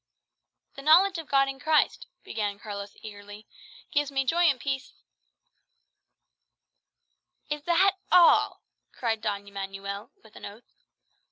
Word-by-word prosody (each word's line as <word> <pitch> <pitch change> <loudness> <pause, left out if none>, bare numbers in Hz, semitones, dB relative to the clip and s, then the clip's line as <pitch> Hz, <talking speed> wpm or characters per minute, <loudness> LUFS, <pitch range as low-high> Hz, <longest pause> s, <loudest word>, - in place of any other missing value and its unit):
"The 275 - -10
knowledge 345 +5 +5
of 320 - -9
God 275 -1 +3
in 270 0 -6
Christ," 310 +3 +1 0.2
began 205 -2 -3
Carlos 200 -2 -8
eagerly, 205 0 -11 0.5
"gives 290 -1 0
me 270 -1 0
joy 340 +6 +2
and 280 -6 +3
peace 275 0 -4 1.7
" - - -35
"Is 295 0 -2
that 380 +3 +3
all?" 350 -2 +5 0.3
cried 225 -3 -2
Don 200 -2 -4
Manuel 200 +1 -6
with 220 -1 -19
an - - -13
oath. 210 +4 -12
255 Hz, 125 wpm, -27 LUFS, 205-300 Hz, 1.7 s, knowledge